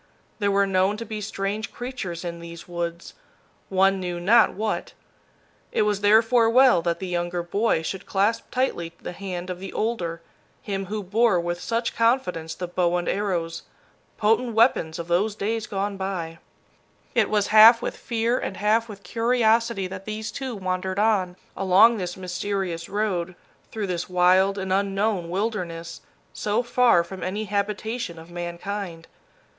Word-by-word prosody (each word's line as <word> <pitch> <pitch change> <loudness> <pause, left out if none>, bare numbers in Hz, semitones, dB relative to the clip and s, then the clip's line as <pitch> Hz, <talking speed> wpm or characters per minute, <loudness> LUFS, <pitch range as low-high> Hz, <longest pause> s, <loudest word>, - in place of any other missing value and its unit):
There 205 -1 +1
were 200 0 +3
known 195 +2 +1
to 230 - -6
be 215 -1 -5
strange 200 +2 -3
creatures 205 -9 -5
in 170 -1 -5
these 170 0 -10
woods, 170 0 -5 0.6
one 195 0 +3
knew 175 -1 -3
not 220 +6 +4
what. 215 +1 -3 0.8
It - - +2
was 205 -1 0
therefore 225 +3 +5
well 255 -5 +5
that 170 0 -1
the 190 - -5
younger 175 -1 -2
boy 200 -1 0
should 190 +3 -5
clasp 205 +4 0
tightly 175 -10 -1
the - - -6
hand 180 -1 -5
of 180 - -6
the 195 - -7
older, 175 -7 -2 0.4
him 195 -2 -3
who 210 +1 -4
bore 210 0 +3
with 175 +1 -3
such 230 +3 -2
confidence 230 -9 +1
the 180 - -5
bow 175 0 +1
and 175 - -3
arrows, 175 -5 -1 0.6
potent 225 +2 +1
weapons 225 -9 +3
of 170 -1 -6
those 200 +5 +1
days 220 +2 -2
gone 200 0 -2
by! 180 -4 -4 0.7
It - - +2
was 210 -2 +1
half 225 +2 +9
with - - -4
fear 235 +1 -1
and 190 - -4
half 220 +3 +2
with 200 -1 -10
curiosity 230 -3 +1
that 190 +1 -7
these 215 0 -4
two 265 -3 -5
wandered 185 -1 -3
on, 200 -4 +2 0.2
along 195 +4 +5
this 180 -1 -4
mysterious 185 -2 -3
road, 190 -4 -1 0.4
through 215 -2 -3
this 180 -2 -3
wild 185 +2 +4
and 190 -1 -2
unknown 195 -2 0
wilderness, 180 -4 -3 0.3
so 210 +3 0
far 240 -7 +4
from 185 +2 -9
any 200 +4 -2
habitation 210 0 -3
of 165 +1 -12
mankind. 175 0 -5
195 Hz, 160 wpm, -24 LUFS, 175-220 Hz, 0.8 s, half